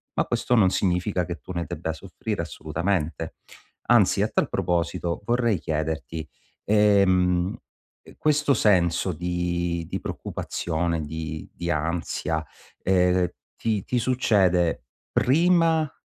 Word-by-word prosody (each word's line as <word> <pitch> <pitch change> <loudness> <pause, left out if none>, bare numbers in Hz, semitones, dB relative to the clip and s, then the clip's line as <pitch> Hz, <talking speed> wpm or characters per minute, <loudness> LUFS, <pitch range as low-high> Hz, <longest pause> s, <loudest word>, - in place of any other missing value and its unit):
Ma - - +1
questo 125 - 0
non 100 -5 +5
significa 90 0 0
che 85 0 -5
tu - - -10
ne 85 -1 -2
debba 80 +2 -3
soffrire 80 - -5
assolutamente. 80 -1 -2 0.5
Anzi - - +5
a - - +2
tal - - 0
proposito 85 0 -1
vorrei 120 -3 +1
chiederti: 80 -1 -3 0.4
ehm, 95 -4 +3 0.6
questo 150 -2 +2
senso 90 -4 +2
di 85 0 -2
di 95 +1 -3
preoccupazione, 85 0 -3
di 80 +1 -6
di 85 0 -4
ansia, 80 0 -1 0.4
ehm, 90 -1 +3 0.3
ti 110 -4 -1
ti 125 - 0
succede 95 - +2 0.3
prima, 165 +1 +3
90 Hz, 110 wpm, -25 LUFS, 85-105 Hz, 0.6 s, non